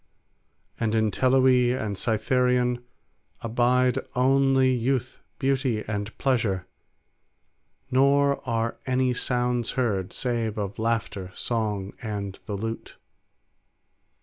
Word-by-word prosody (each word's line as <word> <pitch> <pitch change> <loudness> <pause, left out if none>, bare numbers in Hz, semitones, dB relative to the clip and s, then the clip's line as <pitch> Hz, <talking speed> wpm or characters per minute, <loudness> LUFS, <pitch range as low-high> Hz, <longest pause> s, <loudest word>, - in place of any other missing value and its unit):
And 115 -1 0
in 110 -1 +2
Teloe 130 +1 +4
and 105 -2 -3
Cytharion 125 +3 +1 0.6
abide 125 +2 +2 0.2
only 135 0 +3
youth, 125 +1 -1 0.2
beauty, 130 -5 0
and 105 0 -4
pleasure, 110 -9 0 1.3
nor 140 +2 +3
are 115 0 -1
any 130 0 +2
sounds 125 -1 0
heard, 100 -7 0
save 115 -4 -2
of 100 -1 -4
laughter, 110 -4 -1
song, 105 -4 -2
and 100 -3 -5
the 105 -3 -3
lute. 115 +2 -5
120 Hz, 95 wpm, -26 LUFS, 110-130 Hz, 1.3 s, Teloe